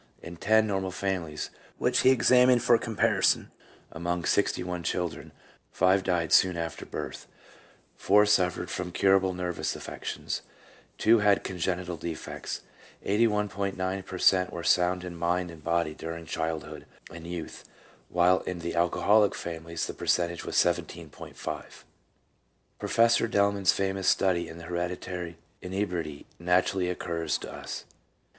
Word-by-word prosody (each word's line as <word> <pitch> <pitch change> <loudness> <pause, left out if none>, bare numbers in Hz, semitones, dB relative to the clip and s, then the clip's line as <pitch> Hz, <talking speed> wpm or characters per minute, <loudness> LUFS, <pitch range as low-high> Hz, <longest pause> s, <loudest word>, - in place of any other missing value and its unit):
In 85 +1 -8
ten 110 +5 +3
normal 95 -3 -1
families, 90 -5 -3 0.3
which - - +2
he 130 - +5
examined 125 -1 +5
for 120 0 +6
com 115 -1 -5
parison, - - +3 0.4
among 85 +1 -3
sixty 100 -2 +1
one 90 -1 -4
children, 85 0 -3 0.4
five 95 +1 +3
died 85 -3 0
soon 90 -2 +5
after 85 0 -5
birth; - - -6 0.7
four 105 +1 +4
suffered 90 -4 +1
from 90 -1 -4
curable 95 0 +3
nervous 90 -1 -2
affections; - - -5 0.6
two 115 +1 +5
had 105 -1 +3
congenital 90 -1 -2
defects. 80 0 -5 0.4
81.9 100 -3 0
per 95 - -7
cent, 90 0 +4
were 85 - -6
sound 90 +1 +2
in 90 -1 -6
mind 85 +1 -1
and 80 -2 -13
body 85 -1 0
during 80 +1 -7
childhood 80 -2 -4 0.3
and 85 0 -9
youth, 85 -2 -6 0.5
while 90 +1 +4
in 90 - -5
the 85 0 -4
alcoholic 100 +5 +3
families 85 0 -4
the - - -5
per - - -8
centage 85 -1 +1
was - - -5
17.5. - - -2 1.2
Professor 115 0 +3
Delman's 100 -3 +3
famous 95 -1 -1
study 90 -3 +2
in 80 - -9
hereditary 90 0 -4 0.2
inebriety 90 -6 -3
naturally 90 +1 +1
occurs 85 -3 -2
to - - -8
us. - - -7
90 Hz, 135 wpm, -28 LUFS, 85-95 Hz, 1.2 s, for